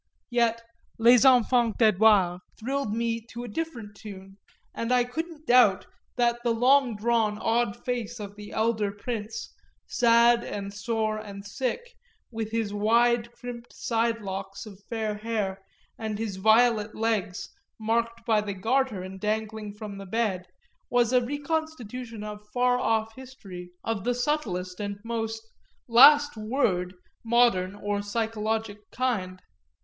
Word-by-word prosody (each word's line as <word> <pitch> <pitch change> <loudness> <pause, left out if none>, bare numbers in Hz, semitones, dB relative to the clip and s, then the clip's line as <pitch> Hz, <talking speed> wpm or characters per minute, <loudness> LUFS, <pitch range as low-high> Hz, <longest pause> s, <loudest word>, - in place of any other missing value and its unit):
Yet 230 -1 +1 0.3
Les 240 +2 +6
Enfants 245 -3 +4
d'Edouard 210 -4 +4 0.2
thrilled 270 0 -2
me 230 +1 -1
to 240 +1 -7
a - - -6
different 230 -5 -5
tune, 195 -2 -11 0.4
and 230 +1 -3
I 250 -1 +4
couldn't 315 +5 -6
doubt 240 -8 +5 0.3
that 240 -1 +2
the 240 - +1
long 255 0 +4
drawn 215 -1 +1
odd 225 -1 0
face 240 -2 -3
of 205 -1 -7
the 205 0 -10
elder 220 -2 0
prince, 215 +1 -5 0.3
sad 235 0 +4
and 200 -1 -5
sore 215 +1 -1
and 200 -2 -9
sick, 265 - -4 0.4
with 225 -2 -4
his 225 -2 -2
wide 235 +3 +2
crimped 240 -1 -9
side 230 0 -1
locks 195 +1 -6
of 200 -2 -13
fair 220 -2 -2
hair 210 -3 -3 0.4
and 220 -2 -3
his 210 -3 -4
violet 220 +1 +3
legs 215 -4 -1 0.3
marked 230 +1 -1
by 220 -3 +3
the 205 -1 -5
Garter 225 0 0
and 190 +1 -8
dangling 215 0 -2
from 210 -1 -8
the 195 - -9
bed, 190 -4 -1 0.4
was 245 0 +2
a 250 -1 +4
reconstitution 255 -6 -4
of 210 0 -7
far 250 +1 +2
off 225 -2 0
history 205 -9 -10
of 225 -4 -2
the 245 +2 0
subtlest 210 -10 -2
and 205 -1 -4
most 225 -1 -4 0.4
"last 290 +4 +7
word" 215 -6 -1 0.3
modern 225 -5 +3
or 205 0 -2
psychologic 220 0 -3
kind. 200 -8 -2
225 Hz, 140 wpm, -27 LUFS, 205-240 Hz, 0.4 s, last